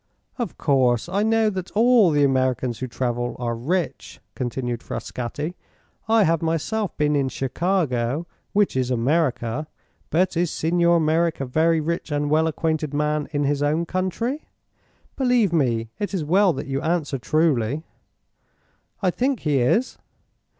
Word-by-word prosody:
"Of 235 -7 -3
course, 130 -4 +2
I 195 +3 0
know 220 0 +2
that 185 -2 -5
all 230 -3 +5
the 145 -2 +3
Americans 130 -3 +1
who 130 - -3
travel 120 0 -2
are 120 -1 -2
rich," 140 +3 -3
continued 120 -1 -3
Frascatti. 145 +7 -5 0.5
"I 225 -1 +4
have 165 -2 +2
myself 170 +6 -1
been 150 0 +2
in 135 -2 +1
Chicago, 135 -1 -1 0.3
which 205 -6 +2
is 130 -1 0
America. 130 +1 0 0.4
But 180 +2 +1
is 170 0 +1
Signor 170 +1 +2
Merreek 160 +1 +1
a 135 - -2
very 160 +5 +2
rich 165 +1 -3
and 145 0 -1
well 160 +1 +3
acquainted 155 -2 -1
man 150 0 0
in 145 -1 0
his 145 0 0
own 155 +3 +1
country? 190 - -2 0.7
Believe 245 -8 +2
me, 115 -7 +1
it 205 -1 -2
is 165 -5 -2
well 190 +4 +4
that - - -5
you 135 0 -2
answer 155 -5 -1
truly." 150 -2 +1 1.2
"I 185 - +3
think 255 +4 -1
he 145 -3 +1
is." 215 - +1
155 Hz, 150 wpm, -23 LUFS, 130-180 Hz, 1.2 s, all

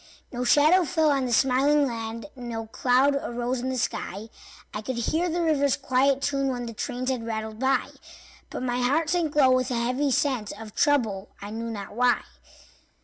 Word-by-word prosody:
No 245 0 -3
shadow 305 +8 +5
fell 320 -2 +2
on 270 -2 +1
the - - -3
smiling 275 +4 +3
land, 230 -2 -5
No 235 -3 -5
cloud 255 +5 +2
arose 245 -2 -2
in 255 +2 -3
the 260 - -2
sky; 215 -2 -3 0.4
I 210 - -4
could 255 +4 -4
hear 320 +9 0
the 340 +1 -1
river's 285 -4 +2
quiet 275 0 +1
tune 275 -1 0
When 245 -2 -2
the 230 - -6
trains 250 +3 -3
had 250 -3 -3
rattled 220 -1 -4
by; 265 +1 +1 0.6
But - - -5
my 245 -1 -1
heart 295 +6 +1
sank 335 -4 0
low 270 -3 +5
with 255 0 +2
a 250 - -1
heavy 250 +5 0
sense 255 -6 0
Of 215 0 -10
trouble, 225 -9 +1
I 205 +1 -8
knew 230 +1 -4
not 205 -3 -6
why. 245 +1 +3
255 Hz, 190 wpm, -26 LUFS, 230-280 Hz, 0.6 s, shadow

